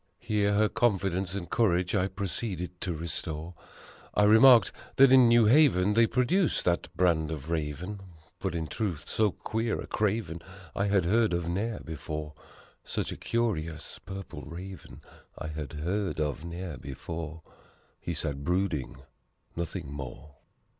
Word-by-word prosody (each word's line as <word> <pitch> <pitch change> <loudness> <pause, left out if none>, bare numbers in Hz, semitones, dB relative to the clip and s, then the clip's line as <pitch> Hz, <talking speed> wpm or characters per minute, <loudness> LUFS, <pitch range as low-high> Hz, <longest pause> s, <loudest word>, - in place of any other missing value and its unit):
Here 105 -3 +1
her 105 +1 +4
confidence 95 -5 0
and 90 -3 -4
courage 90 -5 +1
I 95 -3 +2
proceeded 95 -2 -4
to 90 -3 -2
restore. 80 0 -4 0.6
I 105 - +4
remarked 115 +3 +7 0.2
that 135 -1 +7
in 130 -2 +8
New 115 -1 +6
Haven, 105 - +5
they 115 +1 +5
produced 135 - +1
that 85 -1 +1
brand 85 -4 +2
of 80 0 -5
Raven, 85 +6 -3 0.4
But 95 -3 -2
in 80 -1 -2
truth, 85 -4 -3
so 110 -1 +2
queer 110 +3 -2
a - - -5
craven 105 -6 -1 0.3
I 100 - +1
had 100 -3 +2
heard 110 +2 +3
of 85 -1 -1
ne'er 105 +6 -2
before; 75 -1 -5 0.5
Such - - -3
a - - -4
curious 85 -10 -2
Purple 95 -5 -8
Raven 90 +5 -9 0.4
I 80 - -5
had 75 0 -6
heard 90 +5 -2
of 75 0 -1
ne'er 85 -2 -6
before 80 +4 -7 0.6
He 85 - -4
sat 70 -3 -3
brooding 85 -6 -1 0.5
nothing 85 -4 -4
more. 70 +1 -8
90 Hz, 145 wpm, -29 LUFS, 80-105 Hz, 0.6 s, in